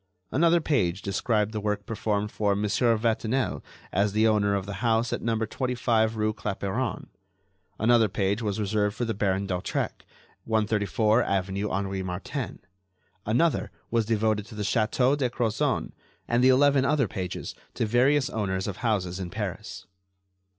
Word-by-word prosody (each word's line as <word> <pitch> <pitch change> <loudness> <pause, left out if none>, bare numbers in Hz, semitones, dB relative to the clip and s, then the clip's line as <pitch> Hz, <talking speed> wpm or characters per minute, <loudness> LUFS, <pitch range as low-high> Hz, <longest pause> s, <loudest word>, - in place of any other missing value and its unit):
Another 170 +4 +4
page 100 - 0
described 105 +1 0
the 110 -1 -3
work 105 0 -2
performed 105 -1 -2
for 100 -2 +1
Mon. 105 +1 0
Vatinel 115 +2 +1 0.3
as 100 +2 +1
owner 105 -2 +3
of 100 -2 -2
the 100 -1 -6
house 115 0 +1
at - - -2
No. 115 -1 0
25 115 -1 0
rue 110 0 0
Clapeyron. 100 +2 -3 0.7
Another 115 0 +4
page 100 +3 0
was 105 -1 -2
reserved 105 0 0
for 120 - -2
the 115 - -1
Baron 100 -1 0
d'Hautrec, 90 -2 -3 0.4
134 110 +1 +2
avenue 100 0 -1
Henri 95 -1 -2
Martin; 95 +8 -4 0.7
another 125 +10 +2 0.2
was 115 -2 +1
devoted 110 -2 +1
to 110 - -11
the 105 - -3
Château 125 +5 +2
de 135 -4 0
Crozon, 120 +3 -1 0.4
and 120 +1 +2
the 130 - +7
eleven 140 +1 +5
other 140 -3 +2
pages 90 -2 -5 0.2
to - - 0
various 130 +5 +3
owners 95 -3 -1
of 100 - -4
houses 100 -6 -1
in 90 -2 -4
Paris. - - -5
110 Hz, 150 wpm, -27 LUFS, 100-120 Hz, 0.7 s, the